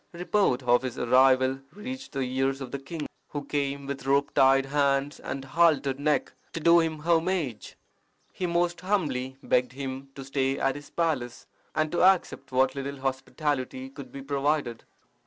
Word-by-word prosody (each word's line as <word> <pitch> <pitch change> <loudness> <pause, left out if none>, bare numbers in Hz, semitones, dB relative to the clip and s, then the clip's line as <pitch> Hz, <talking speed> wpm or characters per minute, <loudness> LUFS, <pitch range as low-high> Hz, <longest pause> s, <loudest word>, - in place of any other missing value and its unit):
Report 175 -6 +1
of 120 0 +4
his 130 -2 -5
arrival 130 +1 +4
reached 260 +6 -7
the 135 - -2
ears 135 +1 0
of 130 -3 -7
the 140 - -4
king, 150 +3 -6 0.2
who 145 -1 -5
came 140 -1 -2
with 135 -1 -5
rope 140 +1 +2
tied 135 0 +5
hands 140 0 +1
and 135 0 -5
haltered 140 -2 +2
neck 150 +1 +1 0.2
to - - -3
do 170 +2 +6
him 160 -1 0
homage. 165 - 0 0.6
He 180 - -2
most 175 0 0
humbly 140 -10 -1
begged 125 0 +1
him 135 0 -6
to 135 - -8
stay 135 0 0
at 135 - +1
his 145 +1 -10
palace, 145 -8 -2 0.3
and 155 0 +1
to 175 - 0
accept 185 -6 +3
what 130 +1 +3
little 140 0 -5
hospitality 130 -1 -2
could 135 -3 -10
be 135 +1 -8
provided. 140 -3 -1
140 Hz, 165 wpm, -27 LUFS, 130-155 Hz, 0.6 s, do